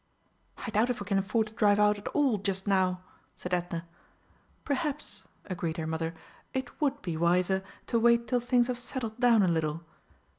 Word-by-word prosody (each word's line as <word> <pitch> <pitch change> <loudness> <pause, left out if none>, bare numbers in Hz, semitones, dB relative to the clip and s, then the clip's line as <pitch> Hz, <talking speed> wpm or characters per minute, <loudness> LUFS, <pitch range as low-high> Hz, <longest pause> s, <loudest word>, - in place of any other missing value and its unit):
"I - - -5
doubt 220 +4 +2
if 245 - -1
we 205 - -5
can 195 0 +2
afford 220 +3 +1
to 215 - -12
drive 210 -2 +3
out 210 0 +4
at 205 - -8
all 270 -8 +2
just 190 -1 -2
now," 185 -2 +1 0.3
said 180 - -5
Edna. 175 -1 -2 0.8
"Perhaps," 295 0 -2 0.2
agreed 170 -3 -3
her 160 - -2
mother, 160 +1 -2 0.4
"it 260 +4 -4
would 285 -1 +1
be 170 -3 -2
wiser 180 +3 +2 0.2
to 235 - +1
wait 235 0 +4
till 250 - +2
things 245 0 +3
have 245 -1 -3
settled 240 -3 -5
down 235 -4 +5
a - - +3
little. 160 -1 0
205 Hz, 185 wpm, -29 LUFS, 180-240 Hz, 0.8 s, down